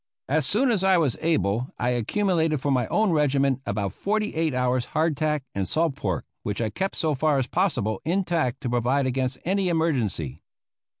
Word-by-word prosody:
As 150 -1 +1
soon 245 - +3
as 200 -5 +1
I 190 -1 +5
was 150 -8 +1
able 125 -7 0
I 120 - 0
accumulated 160 - +1
for 140 +2 -1
my 125 -4 +1
own 215 -2 +2
regiment 140 -3 +2
about 100 -2 -2
forty 210 +1 -1
eight 160 -1 0
hours' 125 -1 0
hardtack 155 -2 +1
and 95 -2 -2
salt 160 -3 +1
pork, 95 -10 -2 0.2
which 105 0 -3
I 110 -2 -1
kept 195 +7 -2
so 155 -2 0
far 145 +1 +2
as 130 - +1
possible 120 - 0
intact 165 -7 0
to 130 - -2
provide 125 +3 +1
against 130 0 -1
any 190 +1 +1
emergency. 125 - -1
140 Hz, 180 wpm, -25 LUFS, 125-165 Hz, 0.2 s, I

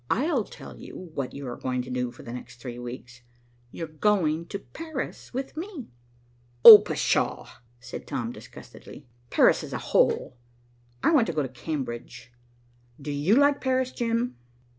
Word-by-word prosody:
"I'll 265 - +1
tell - - -12
you 180 -3 -10
what 135 -4 -4
you 140 -1 -7
are 120 - -5
going 125 -1 -3
to 130 - -9
do 125 -1 -1
for 120 - -14
the 120 - -8
next 120 0 -9
three 120 0 -7
weeks. 125 0 -9 0.5
You're 165 - -6
going 165 -1 0
to 200 - -4
Paris 315 +7 -7
with 265 +3 -5
me." 330 - -7 0.8
"Oh, 215 -2 +14
pshaw!" 210 - -1 0.3
said - - -9
Tom - - -3
disgustedly. - - -13 0.2
"Paris - - +4
is - - -8
a - - -1 0.2
hole. 125 - +2 0.7
I - - +4
want 265 -9 +4
to 170 - -2
go 155 -1 0
to 130 - -4
Cambridge. 125 -3 -6 0.7
Do 145 +1 -5
you 145 +9 +2
like 285 +1 +4
Paris, 260 -1 0
Jim?" 230 - -2
160 Hz, 160 wpm, -26 LUFS, -, 0.8 s, Oh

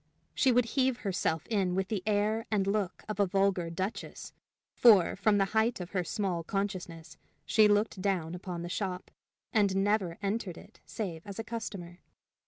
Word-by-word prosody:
She 265 - +3
would 245 0 +4
heave 260 +1 +1
herself 175 -5 -1
in 195 -5 0
with 190 0 -1
the 210 -4 -1
air 215 +2 +1
and 205 -3 +1
look 200 -2 -1
of 215 -1 -5
a 200 - +4
vulgar 195 -2 +1
duchess; 190 +6 -5 0.4
for, 210 -8 +6
from 205 +2 +2
the 195 - +3
height 220 +1 +2
of 180 -1 -7
her 185 -3 0
small 180 -2 -2
consciousness, 175 -5 -4 0.3
she 215 -2 +5
looked 205 -1 +1
down 180 -4 -1
upon 180 -1 -5
the - - -4
shop, 180 0 -4 0.4
and 200 -4 +3
never 195 -3 +1
entered 200 -3 -2
it - - -15
save 175 -7 -4
as 200 - -7
a 225 - -3
customer. 205 -6 -6
195 Hz, 175 wpm, -30 LUFS, 180-215 Hz, 0.4 s, for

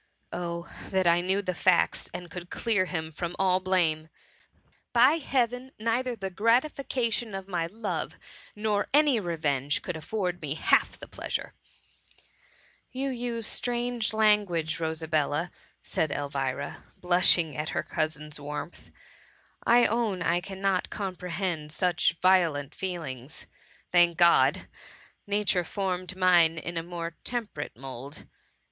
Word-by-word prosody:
Oh, 170 -1 -4 0.2
that 190 -1 +1
I 170 0 +5
knew 190 +3 0
the 185 - -1
facts, 180 0 +2
and 175 -2 -8
could 175 -1 -8
clear 215 -5 +1
him 160 -3 -4
from 175 +2 -4
all 185 -1 +3
blame! 170 -4 +1 0.8
By 255 +7 +6
heaven! 255 -2 -1
neither 235 +3 0
the 195 -3 -5
gratifica 235 +3 +1
tion 220 -4 -3
of 195 0 -6
my 175 -4 -1
love, 215 +3 -4 0.4
nor 210 -1 0
any 295 -5 +5
revenge, 150 -6 -1
could 180 - -4
afford 180 +1 -3
me 150 -1 -3
half - - +2
the - - -10
pleasure - - -4 0.5
!*' - - -32
" - - -32
You 270 +2 -2
use 235 -2 -2
strange 240 -1 0
language, 205 -8 +2
Rosabella," 160 0 -1 0.3
said 155 - -1
Elvira, 140 -2 -3
blushing 175 -3 +4
at 150 +1 -3
her - - -1
cousin's 150 -1 -3
warmth; 150 +4 -7
'^ - - -28 0.7
I 240 +1 +6
own 220 -6 0
I 175 +1 +2
cannot 190 0 -1
comprehend 180 -5 -3
such 175 +2 +1
violent 165 -7 +3
feelings. 155 -8 -6 0.5
Thank 175 -1 +4
God! 170 -1 +5 0.6
nature 200 -3 +2
formed 185 0 -3
mine 175 -3 +5
in 175 +2 -5
a 165 - 0
more 170 -1 -6
temperate 215 - -4
mould." 135 +2 -9
180 Hz, 135 wpm, -28 LUFS, 160-210 Hz, 0.8 s, By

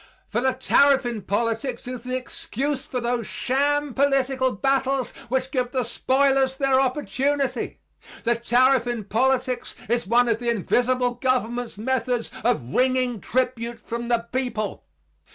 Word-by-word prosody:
For 235 - 0
the 260 0 +2
tariff 270 +1 +4
in 235 -3 -3
politics 230 +5 -2
is 250 -2 -6
the 255 0 -2
excuse 265 +2 -4
for 250 - -2
those 240 -1 -1
sham 285 +5 0
political 270 -1 +2
battles 270 +3 0 0.2
which 260 +1 -1
give 250 -2 -1
the 255 -2 +1
spoilers 265 +2 +2
their 270 -1 +3
opportunity. 270 -1 -1 0.4
The 235 - +3
tariff 245 +1 +3
in 240 -3 -2
politics 255 +4 0
is 235 -2 0
one 240 +3 +4
of 225 -1 +1
the 240 -1 -1
invisible 245 +3 +1
government's 245 -2 -1
methods 245 0 -1
of 215 - 0
wringing 255 -3 +1
tribute 240 -2 -1
from 235 +1 -5
the 235 -1 0
people. 245 -6 -2
250 Hz, 140 wpm, -24 LUFS, 235-265 Hz, 0.4 s, tariff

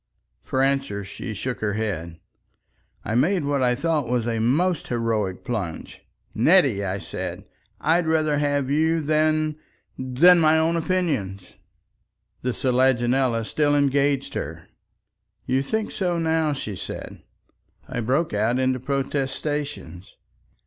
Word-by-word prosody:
For 130 0 0
answer 135 -7 0
she 105 +3 -7
shook 125 +1 -4
her 105 -2 -1
head. 85 -7 -3 0.9
I - - -2
made 155 - +2
what 140 -1 0
I 125 -1 +3
thought 150 -1 0
was 120 -2 0
a 115 -1 -1
most 155 +9 +1
heroic 110 -6 -1
plunge. 105 -10 -5 0.3
"Nettie," 135 - +4
I 95 0 -2
said, - - -6 0.3
"I'd 165 +1 +2
rather 155 -2 +2
have 145 -2 0
you 160 +3 +2
than—than 155 0 +2
my 160 -1 +4
own 160 +1 +2
opinions." 150 - -2 0.9
The 125 - -1
selaginella 125 -2 +2
still 145 +4 +1
engaged 140 -1 +1
her. - - -6 0.8
"You 130 +1 +1
think 220 +10 -2
so 180 -3 -1
now," 160 -2 +1
she 110 -7 -5
said. - - -8 0.7
I - - -4
broke 135 +7 0
out 110 +4 +1
into 130 0 +1
protestations. 140 - -3
135 Hz, 125 wpm, -24 LUFS, 115-155 Hz, 0.9 s, Nettie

